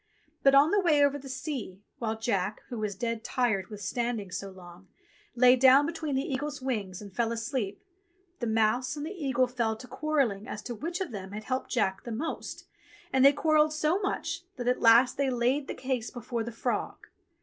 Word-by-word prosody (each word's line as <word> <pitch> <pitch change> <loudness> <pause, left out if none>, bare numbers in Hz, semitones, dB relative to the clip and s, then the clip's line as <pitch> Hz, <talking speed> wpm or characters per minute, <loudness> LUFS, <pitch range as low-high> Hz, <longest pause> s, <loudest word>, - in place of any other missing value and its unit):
But 275 0 +5
on 290 +4 +6
the 410 - +4
way 305 -6 +4
over 285 0 0
the 270 0 -10
sea, 255 - -5 0.2
while 225 -2 -2
Jack, 205 -3 -1
who 240 - -5
was 210 -2 -2
dead 230 +2 -3
tired 225 -7 0
with 210 -2 -9
standing 230 -2 -2
so 195 +2 -5
long, 180 0 -14 0.5
lay 250 +1 +7
down 265 +2 +6
between 315 -3 -3
the 265 - +1
eagle's 290 +1 -3
wings 210 -8 -3
and 200 -2 -12
fell 230 +1 +1
asleep, 230 -3 -3 0.6
the 240 - -2
mouse 225 +4 +1
and 290 - -4
the 325 - -5
eagle 265 -8 +1
fell 235 -3 -1
to 250 +3 -11
quarrelling 265 -11 -1
as 210 - -6
to 240 - -5
which 340 - -4
of 365 - -3
them 195 -2 -7
had 215 +1 -6
helped 255 +3 -3
Jack 195 -5 0
the 240 - -6
most, 285 +9 -5 0.5
and 265 0 +4
they 275 - +9
quarrelled 310 +1 +3
so 310 +4 +1
much 335 -4 -2
that 245 -1 -5
at 250 - +1
last 235 +2 +6
they 275 -1 +1
laid 255 +3 +1
the - - -4
case 255 -3 -2
before 240 -1 -4
the 235 - -5
frog. 225 - -3
245 Hz, 205 wpm, -29 LUFS, 220-280 Hz, 0.6 s, they